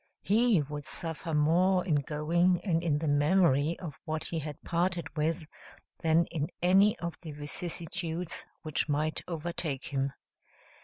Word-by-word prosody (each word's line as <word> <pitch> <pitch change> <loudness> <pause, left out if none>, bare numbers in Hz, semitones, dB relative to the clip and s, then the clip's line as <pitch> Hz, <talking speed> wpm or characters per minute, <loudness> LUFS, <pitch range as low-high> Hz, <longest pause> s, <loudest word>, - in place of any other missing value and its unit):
He 215 -5 +4
would 145 +1 -6
suffer 165 +2 -5
more 180 +5 +3
in 155 -6 +2
going, 170 +5 +2
and 165 -4 +1
in 160 -4 +1
the 155 +1 -2
memory 150 0 +3
of 160 -6 -8
what 155 -2 -3
he 165 - -2
had 150 -1 -6
parted 170 -1 -1
with, 160 +2 0 0.6
than 165 0 +4
in 155 -3 -1
any 195 +4 +5
of 170 -1 -5
the 160 -4 -7
vicissitudes 165 +3 -4 0.2
which 155 -1 -1
might 155 +2 0
overtake 165 -4 -3
him. 135 -1 0
165 Hz, 145 wpm, -30 LUFS, 150-175 Hz, 0.6 s, any